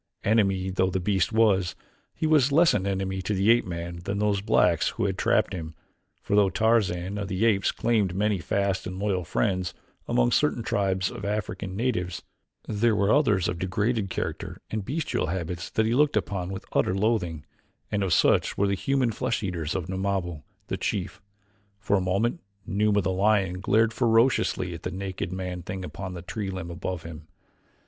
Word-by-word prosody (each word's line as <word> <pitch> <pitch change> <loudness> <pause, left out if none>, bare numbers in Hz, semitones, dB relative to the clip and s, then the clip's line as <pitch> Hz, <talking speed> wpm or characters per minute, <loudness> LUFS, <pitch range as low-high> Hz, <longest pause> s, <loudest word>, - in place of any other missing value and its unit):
Enemy 95 -3 +2
though 95 0 +1
the 95 0 -1
beast 95 +1 +1
was, 100 -6 +3 0.4
he - - -2
was 150 -3 +4
less 165 +3 +5
an 100 -1 0
enemy 95 -1 -2
to 105 +2 -2
the 100 +4 +4
ape 120 0 +3
man 85 0 -5
than 100 +4 -4
those 105 -1 +1
blacks 105 - +3
who - - -2
had - - 0
trapped - - +1
him, 80 -2 -6 0.5
for 100 - 0
though 100 -2 +5
Tarzan 100 -4 +1
of 100 - -3
the 95 +4 0
Apes 100 -4 +3
claimed 105 -6 +1
many 105 0 +1
fast 100 +3 -1
and 90 0 -6
loyal 95 -2 0
friends 95 -2 -1 0.3
among - - +2
certain - - +2
tribes 95 -2 0
of - - -8
African 100 -2 -3
natives, 100 -6 -2 0.4
there 110 +1 +2
were 100 0 +3
others 105 - +3
of 85 - -3
degraded 100 +3 0
character - - -4
and 110 -2 -2
bestial 150 +9 -2
habits 85 0 -4
that 110 - +1
he 115 - +1
looked 145 +3 +3
upon 90 -3 -2
with 95 0 -6
utter 90 - +2
loathing, 95 -8 0 0.5
and 105 - 0
of 95 -2 0
such - - +3
were 100 - +3
the 100 - +1
human 130 +4 +1
flesh 110 +1 -2
eaters 85 -5 -3
of 90 -4 -2
Numabo 95 -4 -2 0.2
the - - -3
chief. 100 0 -3 0.6
For 100 0 +1
a 95 - +2
moment 100 - 0 0.3
Numa, 105 0 +2
the 95 - -1
lion, 95 -1 +2
glared 110 +3 +3
ferociously 115 -6 +2
at 85 - -8
the - - -3
naked 95 0 -4
man 90 -1 -4
thing 95 +2 -5
upon 95 0 -6
the 85 - -7
tree 100 +3 -4
limb 95 -3 -5
above 85 0 -4
him. 80 -1 -9
95 Hz, 185 wpm, -26 LUFS, 90-105 Hz, 0.6 s, less